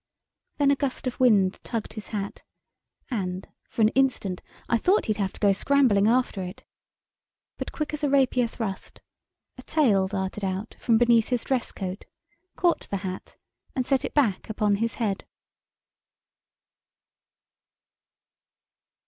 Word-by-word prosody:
Then 280 -1 +4
a - - +4
gust 275 -2 -3
of 255 - -3
wind 205 -7 +4
tugged 230 -3 -4
his 215 -1 -8
hat, 200 -2 -4 0.7
and, 185 -5 -3 0.2
for 225 - 0
an 215 - +6
instant 245 -8 0 0.3
I 235 - +2
thought 385 - +3
he'd 215 -1 0
have 195 -2 -1
to - - -14
go 200 -2 +4
scrambling 215 -2 +3
after 240 -4 +2
it. 185 +2 -7 1.0
But, - - -4
quick 305 -1 -4
as 300 0 -4
a 290 - +2
rapier 260 -3 +3
thrust, 220 -4 -6 0.6
a - - -6
tail 235 -11 +2
darted 190 +1 -3
out 190 +3 -3
from 230 -2 +3
beneath 235 -1 +4
his 245 -2 -1
dress 260 -3 -1
coat, 190 0 -5 0.5
caught 345 -1 +1
the 200 - -1
hat, 185 0 -6 0.4
and 255 -2 0
set 270 0 +1
it - - -5
back 235 -11 +1
upon 210 -2 +1
his 230 +2 -1
head. 205 -5 -1
225 Hz, 145 wpm, -26 LUFS, 195-255 Hz, 1.0 s, an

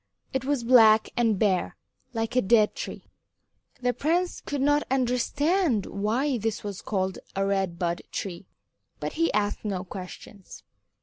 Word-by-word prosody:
It 265 -1 -1
was 280 -3 0
black 225 -3 +6
and 230 -4 +2
bare 190 -3 +1 0.3
like 225 0 -3
a 255 - +5
dead 210 +1 +4
tree. - - -6 0.8
The 245 0 +2
prince 345 +6 0
could 285 -2 -4
not 290 +2 +3
understand 265 - +1
why 240 +6 -1
this 220 0 -2
was 200 -2 -5
called 190 -2 -2 0.2
a 195 0 +1
Red 195 -3 0
Bud 170 0 -1
Tree, 180 -1 -5 0.5
but - - -4
he 330 +1 +1
asked 205 -1 -1
no 195 -4 -2
questions. 190 +1 -10
225 Hz, 145 wpm, -26 LUFS, 195-265 Hz, 0.8 s, black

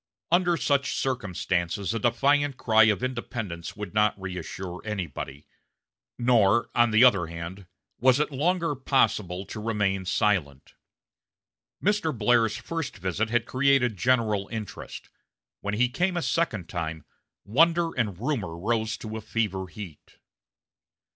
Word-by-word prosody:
Under 175 -1 +3
such 140 -3 +1
circumstances 95 -5 -1
a 115 - -1
defiant 140 +4 +2
cry 110 -1 +5
of 110 +2 +1
independence 115 -9 -4
would 105 -3 -7
not 105 -1 +2
reassure 90 0 -6
anybody; 80 -9 -5 0.7
nor, 115 -3 +3
on 120 0 +4
the 110 +2 +5
other 100 -10 +5
hand, 85 +3 -8 0.3
was 130 +2 +4
it 150 - 0
longer 165 +3 0
possible 105 -9 0
to 105 - -7
remain 105 -4 0
silent. 85 -8 0 1.1
Mr. 200 - +1
Blair's 115 0 +3
first 165 -8 -5
visit 95 +4 -1
had 120 0 +1
created 130 -3 +2
general 110 -2 +1
interest; 110 -2 -7 0.5
when 100 +1 -3
he 125 +3 +3
came 175 +8 -1
a 170 - -1
second 110 - -1
time, 80 -1 -4 0.4
wonder 165 +9 +3
and 105 -7 -1
rumor 110 - -2
rose 110 +3 -1
to 110 0 -6
fever 100 -4 -2
heat. 90 -5 -11
110 Hz, 130 wpm, -26 LUFS, 95-130 Hz, 1.1 s, cry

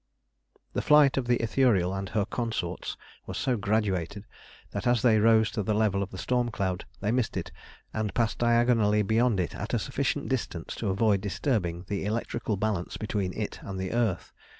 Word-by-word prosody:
The - - 0
flight 150 -2 +5
of 130 -3 -1
the 120 0 +3
Ithuriel 110 -6 +2
and 95 -1 -4
her 100 +2 0
consorts 110 -7 -3 0.3
was - - -5
so 130 - +1
graduated, 100 -2 -1 0.5
that - - -3
as 120 -2 +3
they 110 -3 +5
rose 110 -1 +4
to - - -2
the 105 +2 0
level 105 -2 +2
of 100 - -3
the 95 - -9
storm 125 +3 0
cloud 95 -5 -2 0.2
they 105 +2 0
missed 125 -2 0
it - - -4 0.4
and 110 -2 -1
passed 115 -3 0
diagonally 115 -3 +3
beyond 110 +1 +2
it 90 - -1
at - - -3
a - - +3
sufficient - - -1
distance - - -3
to - - -2
avoid 100 0 +2
disturbing 95 - -1
the 100 -1 -2
electrical 110 -1 -2
balance 100 -4 -2
between 105 -3 -2
it 105 - -4
and 95 -1 -6
the 95 0 -3
earth. 115 -7 -1
105 Hz, 185 wpm, -28 LUFS, 95-115 Hz, 0.5 s, flight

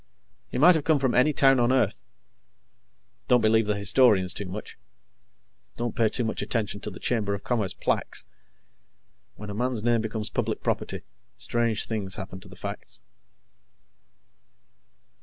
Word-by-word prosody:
He - - -4
might 170 +7 +7
have 160 -3 0
come 155 0 +3
from 130 -3 0
any 130 +5 +4
town 135 -2 +4
on 120 +1 +3
Earth. 130 -6 +1 1.3
Don't 125 - +5
believe 110 0 +3
the 105 -1 0
historians 100 -3 +3
too 100 - -5
much. 100 +4 -7 1.0
Don't 120 -1 -3
pay 115 -2 +3
too 125 - 0
much 110 - -2
attention 105 -1 -2
to - - -4
the 95 - -10
Chamber 105 -5 -1
of 100 - -9
Commerce 110 -6 -1
plaques. - - -1 1.1
When 105 0 -8
a - - -5
man's 120 0 -1
name 120 -1 +2
becomes 110 -1 -4
public - - -2
property, - - -2 0.3
strange 115 -3 -1
things 100 -4 -1
happen 95 -2 -7
to - - -13
the - - -12
facts. - - -7
110 Hz, 155 wpm, -26 LUFS, 100-125 Hz, 1.3 s, might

